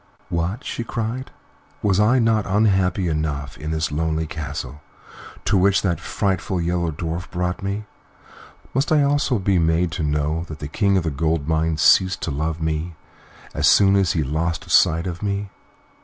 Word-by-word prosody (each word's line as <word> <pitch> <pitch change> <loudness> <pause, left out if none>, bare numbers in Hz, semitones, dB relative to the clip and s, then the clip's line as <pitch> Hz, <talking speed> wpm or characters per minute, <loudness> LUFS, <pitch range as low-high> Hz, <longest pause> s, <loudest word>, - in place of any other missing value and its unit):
"What!" 85 +8 -2
she 120 - -4
cried; 115 +3 -4 0.5
"was 100 -2 +2
I 110 +5 +4
not 115 -3 +2
unhappy 95 -3 +2
enough 75 -3 -2
in 75 0 -5
this 80 -1 -1
lonely 80 +1 -1
castle 75 -2 -6 0.6
to 100 - +2
which 95 +1 +3
that 85 -3 0
frightful 95 -2 -1
Yellow 85 0 0
Dwarf 85 +3 -4
brought 90 0 -2
me? 100 +2 -3 0.9
Must 135 +5 0
I 150 -2 +5
also 140 -3 +1
be 95 -2 +1
made 80 +1 +1
to 85 - -4
know 75 +2 0
that 80 - -7
the 75 - -6
King 100 +5 +1
of 90 - 0
the 80 - -1
Gold 80 +1 -1
Mines 80 -1 +1
ceased 95 0 +5
to 80 - -2
love 80 +3 -2
me 80 +1 -2 0.6
as - - +2
soon 100 -1 +5
as 95 -4 +2
he 80 - 0
lost 80 +4 -2
sight 85 +2 +4
of 85 -2 -5
me? 100 -1 -2
85 Hz, 170 wpm, -22 LUFS, 80-100 Hz, 0.9 s, I